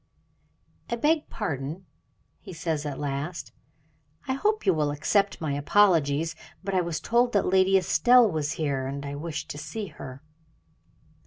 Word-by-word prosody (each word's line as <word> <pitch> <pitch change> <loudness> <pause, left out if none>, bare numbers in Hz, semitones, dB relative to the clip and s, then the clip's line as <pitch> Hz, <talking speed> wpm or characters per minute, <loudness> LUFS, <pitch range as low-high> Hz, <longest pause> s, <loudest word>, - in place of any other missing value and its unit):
"I 235 - 0
beg 300 +6 +1
pardon," 160 - -4 0.5
he 190 - -10
says 160 -3 -2
at 140 -2 -4
last. 145 -1 -4 0.8
"I 265 - +1
hope 420 +10 0
you 190 - +5
will 150 -2 0
accept 195 +7 +1
my 155 -3 -2
apologies; 160 -1 +3 0.3
but 195 0 -3
I 185 - +3
was 170 -2 -3
told 240 +1 +2
that 200 - +2
Lady 190 +1 +4
Estelle 240 +6 +5
was 155 -4 -2
here, 140 -5 -2
and 140 +1 -5
I 140 - -5
wish 155 +2 -5
to 145 - -7
see 200 +7 -5
her." 130 +1 -10
165 Hz, 155 wpm, -26 LUFS, 145-200 Hz, 0.8 s, you